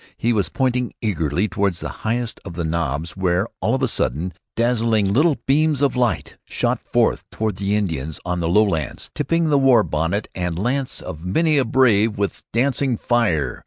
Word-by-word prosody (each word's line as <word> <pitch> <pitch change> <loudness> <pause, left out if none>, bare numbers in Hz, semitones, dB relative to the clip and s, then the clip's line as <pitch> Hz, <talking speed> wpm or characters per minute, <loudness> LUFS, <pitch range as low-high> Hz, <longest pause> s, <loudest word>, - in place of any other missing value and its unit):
He 120 +1 +1
was 100 -6 0
pointing 125 0 0
eagerly 90 -3 0
toward 100 -2 0
the - - -5
highest 115 +1 -2
of 85 - -8
the 85 - -2
knobs, 80 -1 -2
where, 95 0 +1
all - - +1
on 135 - -2
a - - +3
sudden, 85 - -1 0.2
dazzling 115 -4 +1
little 150 +5 +3
beams 150 +1 +2
of 140 - +2
light 125 -2 -1
shot - - 0
forth - - +2
toward 110 -4 -2
the 100 +1 0
Indians 80 -7 -2
in 90 0 -1
the 85 -1 -1
lowlands, 85 - +1
tipping 165 -1 0
the 145 - +4
war 130 -5 +5
bonnet 80 +7 -1
and 90 -2 -3
lance 125 +6 -2
of 80 +1 -8
many 155 - +2
a 130 - +2
brave 115 -4 +3
with 100 -1 -2
dancing 130 +1 +1
fire. 90 - 0
105 Hz, 180 wpm, -21 LUFS, 85-125 Hz, 0.2 s, war